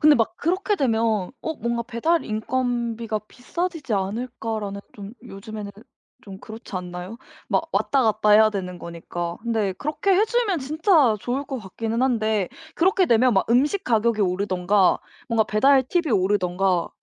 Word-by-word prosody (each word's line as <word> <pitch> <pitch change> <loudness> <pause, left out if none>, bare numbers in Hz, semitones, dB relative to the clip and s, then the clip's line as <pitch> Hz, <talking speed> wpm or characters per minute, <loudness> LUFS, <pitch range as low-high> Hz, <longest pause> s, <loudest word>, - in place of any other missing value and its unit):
근데 300 -2 +6
막 225 -1 0
'그렇게 375 +6 0
되면 225 - +1
어 320 - -3
뭔가 235 -1 -2
배달 315 +9 0
인건비가 230 -1 -2
비싸지지 325 -1 -4
않을까?'라는 215 0 -3
좀 205 +1 -9
요즘에는 210 -2 -8 0.5
좀 195 -4 -10
그렇지 220 -2 -10
않나요? 180 +3 -6 0.3
막 - - 0
왔다 275 -2 +2
갔다 215 -1 +2
해야 215 +1 +7
되는 180 -3 -5
거니까. 170 0 -5
근데 220 -5 0
그렇게 300 - -2
해 410 +4 +4
주면 450 -6 0
진짜 305 - +3
좋을 255 +7 -2
것 270 -2 -5
같기는 225 +4 -3
한데 220 -6 +1 0.3
그렇게 375 +1 +3
되면 245 0 +4
막 190 - +1
음식 290 +11 +2
가격이 225 -2 +2
오르든가 190 0 +2 0.3
뭔가 230 -2 +2
배달 265 +5 +4
팁이 340 0 0
오르든가 185 -2 +1
225 Hz, 330 characters per minute, -23 LUFS, 200-265 Hz, 0.5 s, 해야